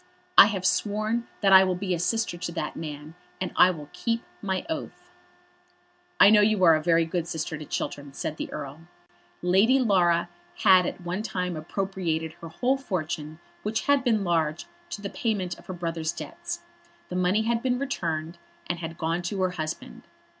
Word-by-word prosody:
"I - - +10
have 195 -4 -3
sworn 215 +5 0
that 195 -2 +5
I 190 0 +10
will 185 -1 0
be 185 0 -2
a 170 - -1
sister 225 +2 0
to 170 0 -4
that 155 -3 -3
man, 150 -1 -7 0.3
and 185 - -2
I 185 - +7
will 155 -5 -5
keep 230 -1 -1 0.2
my 190 +6 -2
oath." 320 - -6 1.1
"I 200 - +9
know 210 -1 +7
you 210 -2 +3
are 165 -2 +8
a 155 - +2
very 165 0 +3
good 170 0 -2
sister 160 -2 -3
to 155 0 -7
Chiltern," 145 0 -4
said 155 +3 -4
the - - -5
Earl. 150 +3 -7 0.6
Lady 195 +9 +4
Laura 180 -9 +3 0.4
had 185 -3 +6
at - - -5
one 175 +3 -3
time 180 -5 -3
appropriated 165 -1 -2
her 165 - -7
whole 255 +11 +1
fortune, 155 - -4 0.2
which 215 +1 -1
had 285 -2 +3
been 225 -5 +2
large, 165 -3 0 0.2
to 205 - -6
the 200 - -3
payment 195 -4 -2
of - - -18
her 185 - -4
brother's 165 -2 -2
debts. - - -6 0.5
The 180 - -5
money 185 +4 +2
had 230 +1 0
been 250 -1 +1
returned, 170 - -3 0.3
and 175 -1 -3
had 165 -1 -6
gone 165 +2 -1
to 185 +3 -3
her 185 - +1
husband. 155 -3 -6
180 Hz, 185 wpm, -26 LUFS, 165-205 Hz, 1.1 s, I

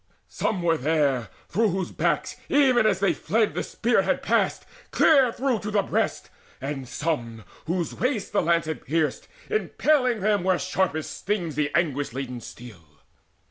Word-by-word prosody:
Some 185 -5 -2
were 165 -1 +3
there, 140 -6 +1 0.2
through 220 +3 +2
whose 185 -1 -2
backs, - - -1
even 260 -6 +4
as 195 -3 +1
they 195 - +3
fled, 220 0 0
The - - -2
spear 235 +1 +1
had - - -1
passed, - - +1 0.2
clear 275 -6 +5
through 255 -2 0
to 210 - -5
the 205 -1 +2
breast, - - -2 0.3
and 135 -1 -5
some 115 -8 -3 0.2
Whose 175 0 -1
waists 250 -4 -1
the 205 - +2
lance 170 -1 +2
had 160 -1 -5
pierced, 155 -1 -1 0.2
impaling 280 - +1
them 205 -1 +2
Where 185 -1 +2
sharpest 180 -4 -1
stings 185 -6 -2
the 145 0 0
anguish 145 -7 0
laden 125 -2 -5
steel. 115 -10 -11
175 Hz, 160 wpm, -25 LUFS, 145-215 Hz, 0.3 s, clear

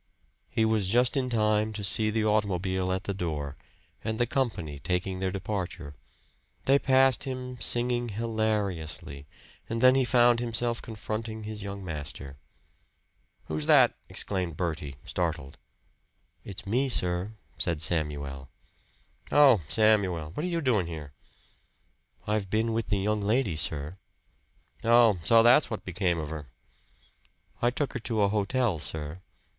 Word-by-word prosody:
He 110 - +1
was 110 -4 +1
just 125 +6 +3
in 130 -2 0
time 110 -1 +1
to 105 -1 -5
see 110 +2 +2
the 110 0 0
automobile 95 -3 0
at 95 0 -1
the 100 - -3
door, 75 -7 -4 0.5
and 110 0 -3
the 120 - +3
company 110 - -2
taking 90 +4 -2
their 95 0 0
departure. 95 -6 -4 0.7
They 135 +1 +5
passed 135 -1 +3
him, 125 -1 -5
singing 120 0 +1
hilariously; 100 -10 -2 0.4
and 115 - -2
then 130 +2 +7
he 135 0 +3
found 120 -1 +4
himself 120 0 -1
confronting 110 0 -5
his 105 0 -6
young 100 -1 -6
master. 75 -4 -7 1.1
"Who's 75 -1 -2
that?" - - +6 0.2
exclaimed 90 -5 -3
Bertie, 75 -6 -3
startled. 80 -6 -3 0.8
"It's 100 +1 -8
me, 125 +7 +1
sir," 90 -1 +1 0.3
said 85 -3 0
Samuel. 75 -5 -2 0.8
"Oh! 135 -9 +6
Samuel! 90 -4 +2
What 150 - -4
are - - -1
you 170 -1 -1
doing 110 - +1
here?" 75 -4 -7 1.1
"I've 105 -2 -1
been 110 +2 0
with 115 0 -1
the 105 - +1
young 105 +2 0
lady, 105 -3 +1
sir." 75 +2 -1 0.9
"Oh! 115 -4 +5
So 115 +7 +5
that's 125 +6 +5
what 110 - -5
became 90 -1 0
of 75 -2 -4
her!" 75 -3 -6 1.1
"I 120 - +4
took 135 +3 -2
her 130 - -3
to 110 -2 0
a 100 - +3
hotel, 105 -1 0
sir." 75 +3 -4
105 Hz, 140 wpm, -28 LUFS, 85-115 Hz, 1.1 s, then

